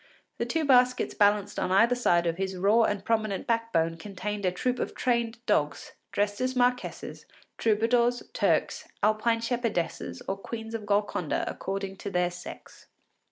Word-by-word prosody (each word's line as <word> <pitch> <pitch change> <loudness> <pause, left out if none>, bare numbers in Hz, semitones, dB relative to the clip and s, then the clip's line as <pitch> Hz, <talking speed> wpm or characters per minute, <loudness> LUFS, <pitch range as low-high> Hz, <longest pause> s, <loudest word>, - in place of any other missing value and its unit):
The - - -1
two 325 -1 0
baskets 250 -2 +4
balanced 205 -1 +2
on 185 - -1
either 230 +6 +5
side 175 -8 +2
of 165 0 -1
his 190 0 -3
raw 210 +5 +4
and 205 -1 -2
prominent 215 -4 0
backbone 205 -9 0
contained 200 +2 -4
a - - +2
troupe 250 +8 -1
of - - -3
trained 235 -2 0
dogs, 145 -7 0 0.2
dressed 205 +3 -1
as 255 0 0
marquesses, 250 0 -1 0.3
troubadours, 235 +2 +2
Turks, - - 0 0.2
Alpine 220 +2 +2
shepherdesses, 230 -8 -2
or 195 - -2
Queens 225 +2 -7
of 215 -2 -5
Golconda, 200 -5 0
according 195 0 -4
to - - -5
their 180 -2 +1
sex. 175 0 -11
210 Hz, 155 wpm, -28 LUFS, 190-235 Hz, 0.3 s, either